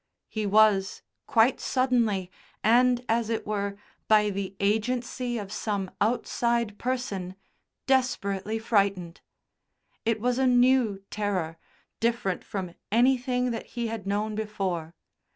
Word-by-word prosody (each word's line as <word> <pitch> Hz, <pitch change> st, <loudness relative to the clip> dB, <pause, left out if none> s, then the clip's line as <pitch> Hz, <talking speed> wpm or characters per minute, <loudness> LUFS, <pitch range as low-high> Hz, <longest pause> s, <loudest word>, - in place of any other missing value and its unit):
He 215 Hz, -2 st, -2 dB
was, 200 Hz, -2 st, +3 dB, 0.2 s
quite 235 Hz, 0 st, +4 dB
suddenly, 235 Hz, -8 st, +1 dB, 0.3 s
and 245 Hz, +2 st, +4 dB
as 230 Hz, 0 st, +1 dB
it 225 Hz, -, -2 dB
were, 200 Hz, -1 st, -2 dB, 0.3 s
by 210 Hz, -1 st, +4 dB
the 195 Hz, 0 st, -4 dB
agency 240 Hz, +4 st, -1 dB
of 200 Hz, -3 st, -6 dB
some 205 Hz, -3 st, -2 dB
outside 235 Hz, -1 st, 0 dB
person, 205 Hz, -8 st, -3 dB, 0.5 s
desperately 220 Hz, -6 st, 0 dB
frightened. 200 Hz, -6 st, 0 dB, 0.8 s
It 225 Hz, -1 st, +1 dB
was 245 Hz, +3 st, 0 dB
a 265 Hz, -, +3 dB
new 245 Hz, -5 st, +3 dB
terror, 185 Hz, -6 st, -2 dB, 0.4 s
different 230 Hz, -5 st, 0 dB
from 185 Hz, -4 st, -5 dB, 0.2 s
anything 250 Hz, +1 st, +2 dB
that 230 Hz, -, -5 dB
he 235 Hz, -1 st, -1 dB
had 220 Hz, -4 st, -5 dB
known 210 Hz, +2 st, -1 dB
before. 190 Hz, -6 st, -3 dB
215 Hz, 115 wpm, -27 LUFS, 200-240 Hz, 0.8 s, quite